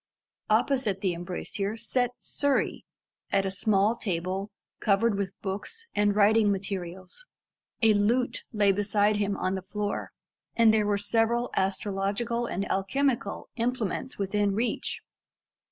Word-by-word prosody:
Opposite 220 -3 +2
the 185 -3 +1
embrasure 185 +4 -4
sat 245 +2 0
Surrey, 285 -1 0 0.5
at 195 0 +2
a 190 - -1
small 205 +2 +2
table 190 -1 -2 0.3
covered 210 +1 +2
with 195 -1 -4
books 210 - -4
and 205 -1 +2
writing 210 0 +5
materials. 190 - -5 0.6
A 220 -1 +7
lute 230 +5 +1
lay 205 -3 +4
beside 205 +1 +2
him 205 -1 0
on 185 +1 -1
the 190 - -2
floor, 205 +2 -3 0.5
and 230 -2 +6
there 215 -1 +2
were 205 -1 +2
several 225 +3 +1
astrological 200 +5 -1
and 195 -1 -2
alchemical 235 +2 0
implements 245 0 -2
within 200 0 0
reach. 235 +3 -2
205 Hz, 125 wpm, -28 LUFS, 195-230 Hz, 0.6 s, A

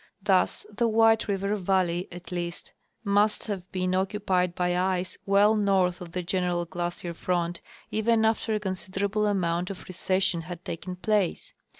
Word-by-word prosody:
Thus 190 -2 +2
the 235 +2 +2
White 225 0 +4
River 200 0 0
valley, 185 -2 +1
at 175 +1 -10
least, 175 -1 -5 0.3
must 205 +1 +2
have 190 -4 -5
been 185 -1 -1
occupied 185 -2 0
by 180 -1 +1
ice 185 0 -1
well 205 +2 +5
north 190 -4 +2
of 170 -1 -9
the 180 - -2
general 175 -1 0
glacier 175 0 -4
front 175 0 -1 0.3
even 220 +1 +2
after 220 0 +1
a - - 0
considerable 200 +2 -1
amount 180 -2 0
of 195 - -8
recession 185 -1 0
had 175 +1 -8
taken 180 +2 -5
place. 200 -1 0
185 Hz, 155 wpm, -27 LUFS, 180-205 Hz, 0.3 s, well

